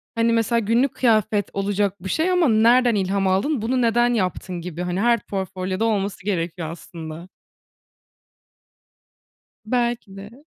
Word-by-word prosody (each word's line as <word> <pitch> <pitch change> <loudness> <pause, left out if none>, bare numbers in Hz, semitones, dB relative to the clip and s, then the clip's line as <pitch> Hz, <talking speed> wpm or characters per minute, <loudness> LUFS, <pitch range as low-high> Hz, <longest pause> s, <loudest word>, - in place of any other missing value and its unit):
hani, 230 0 +2
mesela 230 +1 +2
günlük 235 +5 +1
kıyafet 215 -4 +2
olacak 200 -1 -1
bir 190 - -4
şey 330 - +1
ama 355 -3 +3
nereden 235 +2 +4
ilham 195 0 0
aldın, 215 +8 +1
bunu 250 +3 0
neden 240 +1 +3
yaptın 185 -4 -2
gibi, 175 0 -6
hani, 180 +1 -2
her 235 +1 +3
portfolyoda 190 +1 -3
olması 200 -3 -1
gerekiyor 170 -4 -2
aslında. 165 0 -9 2.4
Belki 235 -4 -1
de. 225 +9 -12
205 Hz, 130 wpm, -22 LUFS, 185-235 Hz, 2.4 s, nereden